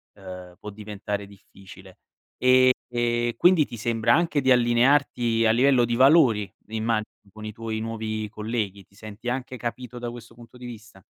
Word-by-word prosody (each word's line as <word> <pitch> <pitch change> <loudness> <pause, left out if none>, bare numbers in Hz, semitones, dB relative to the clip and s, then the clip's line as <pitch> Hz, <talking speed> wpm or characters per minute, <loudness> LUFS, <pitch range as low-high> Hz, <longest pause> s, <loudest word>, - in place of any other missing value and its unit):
uhm, 90 -2 -10
può 105 - -8
diventare 105 -1 -6
difficile. 95 -1 -16 0.4
E 130 0 +5 0.2
e 120 -1 -1
quindi 175 -4 +5
ti 120 - -9
sembra 115 +2 +1
anche 165 -3 +1
di 130 0 +2
allinearti 120 -1 +3
a 110 - +5
livello 125 +1 +4
di 120 - -2
valori, 130 -6 +4 0.2
immagino 110 0 -1 0.3
con 110 +1 -12
i 110 - -5
tuoi 110 0 -5
nuovi 110 -1 -4
colleghi. 105 -3 -4
Ti 100 - -28
senti 110 +3 -8
anche 130 0 -4
capito 120 +1 -6
da 120 0 -4
questo 120 -1 -11
punto 120 +1 -16
di 125 - -11
vista? 110 -5 -11
115 Hz, 165 wpm, -24 LUFS, 105-125 Hz, 0.4 s, E